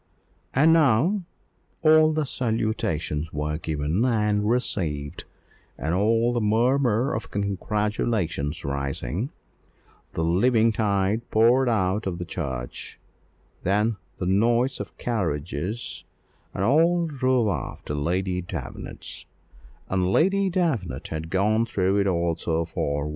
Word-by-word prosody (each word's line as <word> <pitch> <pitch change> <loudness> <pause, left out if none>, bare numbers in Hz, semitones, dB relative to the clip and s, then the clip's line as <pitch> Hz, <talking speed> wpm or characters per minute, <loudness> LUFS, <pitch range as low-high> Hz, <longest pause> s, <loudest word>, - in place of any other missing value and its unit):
And 155 +5 +6
now 165 - +3 0.6
all 155 0 +6
the 155 -1 0
salutations 110 - -1
were 75 +1 -2
given 80 +5 -1
and 105 -4 +1
received, 80 -12 -2 0.5
and 80 +6 -2
all 115 +5 +2
the 120 - 0
murmur 120 +3 +2
of 110 - -4
congratulations 100 -5 -1
rising, 70 - -2 0.8
the 80 - -1
living 110 +7 +3
tide 105 0 0
poured 120 +4 +4
out 100 -2 0
of 90 -2 -2
the 90 - -5
church; 65 -9 -5 0.6
and - - -33
then 105 +3 +1 0.2
the 90 - -3
noise 115 +7 +2
of 95 -6 -7
carriages, 90 -1 -3 0.5
and 95 - -3
all 165 +8 +3
drove 130 -6 +1
off 100 - -4
to - - -3
Lady 90 +5 -1
Davenant's; 90 - -6 0.6
and 95 -1 0
Lady 195 - +3
Davenant 135 - -1
had 80 +1 -5
gone 105 +5 +2
through 95 -1 +1
it 100 - +2
all 85 -2 +1
so 80 0 -1
far, 70 -3 -2
well. 75 - -3
105 Hz, 125 wpm, -25 LUFS, 85-120 Hz, 0.8 s, And